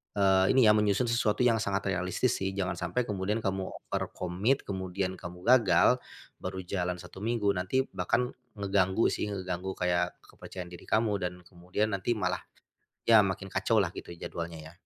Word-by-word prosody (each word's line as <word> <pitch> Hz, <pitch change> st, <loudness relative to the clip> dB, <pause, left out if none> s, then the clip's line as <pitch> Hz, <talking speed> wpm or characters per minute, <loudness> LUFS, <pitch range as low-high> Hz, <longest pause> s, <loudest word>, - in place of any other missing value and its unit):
eee, 95 Hz, -2 st, +4 dB
ini 130 Hz, -, +6 dB
ya 110 Hz, -, +7 dB
menyusun 105 Hz, +3 st, +2 dB
sesuatu 115 Hz, 0 st, +2 dB
yang 115 Hz, -2 st, +4 dB
sangat 100 Hz, -2 st, -1 dB
realistis 95 Hz, +7 st, 0 dB
sih 95 Hz, 0 st, -2 dB
jangan 95 Hz, -2 st, -2 dB
sampai 90 Hz, +8 st, 0 dB
kemudian 105 Hz, 0 st, -2 dB
kamu 95 Hz, -1 st, -1 dB, 0.2 s
overcommit 95 Hz, +10 st, 0 dB
kemudian 95 Hz, -1 st, -3 dB
kamu 90 Hz, +1 st, -9 dB
gagal, 125 Hz, +1 st, +5 dB, 0.4 s
baru 95 Hz, 0 st, -5 dB
jalan 90 Hz, -1 st, -2 dB
1 90 Hz, +1 st, -11 dB
minggu 110 Hz, -1 st, +1 dB
nanti 95 Hz, +8 st, 0 dB
bahkan, 120 Hz, +7 st, 0 dB, 0.2 s
ngeganggu 100 Hz, +1 st, +2 dB
sih -, -, -2 dB
ngeganggu 95 Hz, -1 st, -4 dB
kayak 90 Hz, 0 st, 0 dB
kepercayaan 90 Hz, -1 st, -9 dB
diri 90 Hz, -, -11 dB
kamu 110 Hz, -2 st, +2 dB
dan 90 Hz, -1 st, -2 dB
kemudian 90 Hz, +5 st, -2 dB
nanti 100 Hz, +4 st, 0 dB
malah 90 Hz, -4 st, -1 dB, 0.7 s
ya 110 Hz, -3 st, +8 dB
makin 95 Hz, 0 st, -3 dB
kacau 110 Hz, +3 st, +2 dB
lah 95 Hz, -, +2 dB
gitu -, -, -7 dB
jadwalnya 85 Hz, -1 st, -6 dB
ya. 80 Hz, +1 st, -11 dB
95 Hz, 165 wpm, -29 LUFS, 90-105 Hz, 0.7 s, ya